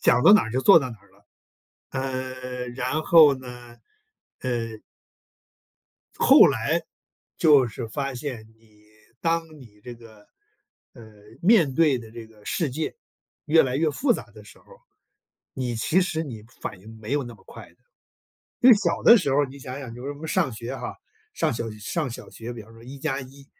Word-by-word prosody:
讲 125 - +3
到 200 - +8
哪 215 - +5
就 130 +3 -1
做 195 +3 +7
到 130 -4 -4
哪 115 - -10
了， 100 +1 -26 0.7
呃， 130 -1 -5
然 130 +5 -2
后 155 -5 +7
呢， 125 -2 -11 0.6
呃 115 -3 -3 1.4
后 - - +7
来， - - 0 0.5
就 145 -5 +5
是 115 +1 -6
发 135 +3 -4
现 125 -4 -6
你 110 -2 -26 0.4
当 165 0 0 0.2
你 105 -4 -17
这 125 -1 -9
个， 110 -3 -17 0.7
呃， - - -14 0.4
面 175 - +4
对 150 -5 +3
的 115 -2 -12
这 115 -1 -10
个 110 -2 -21
世 160 -6 -1
界 155 +5 -4 0.5
越 160 +2 +5
来 130 0 -2
越 155 +1 +1
复 245 - +1
杂 - - -5
的 - - -14
时 - - -16
候， - - -25 0.9
你 125 -2 -3
其 155 +11 +1
实 165 -3 -1
你 115 -8 -8 0.2
反 95 - -6
应 110 +3 -13
没 110 +5 -6
有 145 -1 +1
那 120 -1 -9
么 - - -21
快 - - -12
的。 - - -29 0.8
就 250 0 +8
小 205 - -1
的 235 - +8
时 145 -9 0
候， 145 +1 +3
你 135 +1 -12
想 130 0 -7
想 125 -4 -8
就 125 +2 -10
是 145 - -4
我 145 - -13
们 160 +1 -7
上 130 - 0
学 120 +4 -6
哈， - - -6 0.4
上 - - 0
小 115 -1 -4
学 105 - -11
上 140 +6 -3
小 - - -9
学， 115 +1 -8
比 115 -2 -9
方 110 +2 -17
说 115 0 -16
一 135 +3 -10
加 135 -2 -2
一， 135 +1 -13
130 Hz, 200 characters per minute, -24 LUFS, 115-145 Hz, 1.4 s, 到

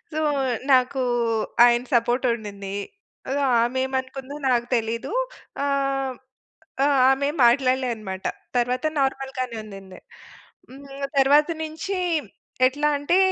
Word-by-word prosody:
So, 310 - -2 0.5
నాకూ 255 +1 +3 0.6
ఆయన 240 0 +4
సపోర్టుండిందీ. 230 -5 -1 0.5
అదో 280 +2 -1 0.2
ఆమేమనుకుందో 260 +2 -2
నాకు 240 -2 +2
తెలీదు. 230 - -3 0.5
ఆ! - - +1 0.5
హ్మ్, 255 - -9 0.7
ఆ! - - +4 0.2
ఆమేం 280 +2 +1
మాట్లాడలే 255 +1 +2
అనమాట. 190 -4 -7 0.3
తరవాత 250 +3 0
నార్మల్‌గానే 265 -2 -2
ఉండింది. 195 -3 -11 0.7
హ్మ్, 275 +1 -9
తరవాత 285 +3 +5
నుంచి 330 0 -2 0.4
ఎట్లా 290 +3 +1
అంటే, 290 +6 +2
260 Hz, 100 wpm, -23 LUFS, 235-280 Hz, 0.7 s, తరవాత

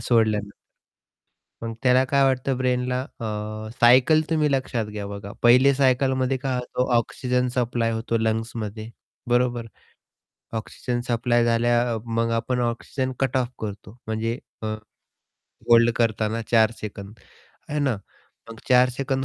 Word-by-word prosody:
सोडल्यानंतर. 110 -3 +1 1.1
मग 115 0 -4
त्याला 130 0 +5
काय 140 -1 +3
वाटतं 130 0 +1
ब्रेनला? 125 0 0
अ, 130 -4 -9 0.6
सायकल 130 +6 +6
तुम्ही 155 -2 +2
लक्षात 130 -4 -1
घ्या, 105 -1 -6
बघा, 100 0 -7
पहिले 125 +3 +6
सायकलमध्ये 130 0 +2
काय 130 0 -2
होतं? 125 +1 -2
ऑक्सिजन 125 +2 0
सप्लाय 120 -2 0
होतो 115 +1 -1
लंग्समध्ये, 110 -1 -3 0.4
बरोबर? 120 -1 +1 0.9
ऑक्सिजन 120 +2 -4
सप्लाय 120 0 +2
झाल्या 120 0 +2
मग 115 0 0
आपण 125 +2 -1
ऑक्सिजन 120 +2 -2
कट 135 -1 +1
ऑफ 125 - +1
करतो 105 0 -7
म्हणजे 115 +2 -2 0.2
अ, 110 - -4 1.0
होल्ड 115 0 +6
करताना 110 -1 0
4 110 -2 +5
सेकंद, 100 -1 -8 0.5
आहे 150 - -2
ना? 135 -6 +1 0.5
मग 115 - -10
4 125 0 +6
सेकंद 135 +1 -2
120 Hz, 130 wpm, -24 LUFS, 115-130 Hz, 1.1 s, सायकल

